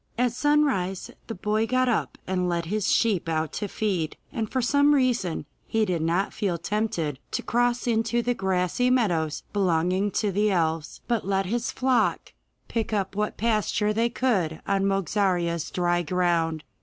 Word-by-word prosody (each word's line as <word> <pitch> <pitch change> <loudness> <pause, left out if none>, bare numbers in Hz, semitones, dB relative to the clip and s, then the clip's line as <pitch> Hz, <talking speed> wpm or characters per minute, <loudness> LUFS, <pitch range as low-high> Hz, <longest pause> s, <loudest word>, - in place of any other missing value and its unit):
At 245 0 +2
sunrise 255 -10 +1 0.2
the 225 - -5
boy 215 +4 0
got 255 +1 +2
up 240 - 0
and 180 -1 0
led 170 -1 -1
his 205 +3 0
sheep 200 -7 +2
out 160 -1 -1
to 205 - -3
feed, 185 -7 -2 0.2
and 220 -2 -3
for 260 - 0
some 285 +4 +4
reason 240 - 0 0.2
he 220 -1 +1
did 180 -4 -1
not 170 +5 0
feel 190 -5 -1
tempted 170 - -2
to - - -3
cross 245 +1 +1
into 235 0 +1
the 245 - +1
grassy 190 +4 0
meadows 175 -12 +1
belonging 185 0 +1
to 210 -2 0
the 210 +3 +2
elves, 165 -4 -1
but 235 -5 -1
let 195 -1 +1
his 235 +5 -1
flock 255 -1 +1 0.3
pick 225 -1 -2
up 195 -2 -1
what 210 +1 -2
pasture 215 -1 +1
they 230 +2 +1
could 195 -11 0
on 195 0 +1
Mogarzea's 180 -4 0
dry 175 -1 +1
ground. 165 -2 0
200 Hz, 165 wpm, -26 LUFS, 175-230 Hz, 0.3 s, some